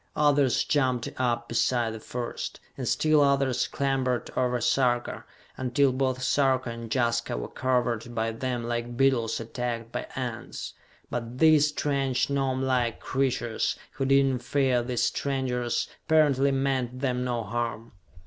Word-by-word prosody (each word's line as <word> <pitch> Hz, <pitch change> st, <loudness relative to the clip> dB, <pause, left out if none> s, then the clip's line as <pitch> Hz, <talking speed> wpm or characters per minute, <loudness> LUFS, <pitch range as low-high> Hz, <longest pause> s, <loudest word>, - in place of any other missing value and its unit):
Others 145 Hz, -3 st, +3 dB
jumped 130 Hz, -5 st, +1 dB
up 120 Hz, -2 st, 0 dB
beside 120 Hz, 0 st, +1 dB
the 110 Hz, -, -7 dB
first, 120 Hz, +2 st, -5 dB, 0.2 s
and 130 Hz, -3 st, -4 dB
still 155 Hz, +3 st, +3 dB
others 140 Hz, -2 st, +2 dB
clambered 135 Hz, -3 st, -1 dB
over 125 Hz, -1 st, +1 dB
Sarka, 120 Hz, -1 st, +1 dB, 0.3 s
until 130 Hz, +2 st, +2 dB
both 130 Hz, 0 st, -1 dB
Sarka 130 Hz, -2 st, +2 dB
and 115 Hz, -1 st, -7 dB
Jaska 120 Hz, -, 0 dB
were -, -, -4 dB
covered 120 Hz, -2 st, -1 dB
by 115 Hz, 0 st, 0 dB
them 120 Hz, +1 st, -3 dB
like 120 Hz, 0 st, -3 dB
beetles 120 Hz, -4 st, +2 dB
attacked 115 Hz, 0 st, -4 dB
by -, -, -4 dB
ants. -, -, -5 dB, 0.4 s
But 120 Hz, 0 st, -4 dB
these 155 Hz, 0 st, +6 dB
strange 140 Hz, -3 st, 0 dB
gnomelike 130 Hz, -3 st, 0 dB
creatures, 125 Hz, -4 st, -1 dB
who 135 Hz, -, -3 dB
did 135 Hz, +1 st, +5 dB
not 130 Hz, -2 st, 0 dB
fear 130 Hz, -1 st, +1 dB
these 120 Hz, 0 st, -1 dB
strangers, 125 Hz, -3 st, -1 dB, 0.2 s
apparently 145 Hz, -4 st, +4 dB
meant 135 Hz, -2 st, -1 dB
them 125 Hz, -2 st, 0 dB
no 120 Hz, -2 st, -1 dB
harm. 115 Hz, +1 st, -3 dB
125 Hz, 140 wpm, -27 LUFS, 120-135 Hz, 0.4 s, these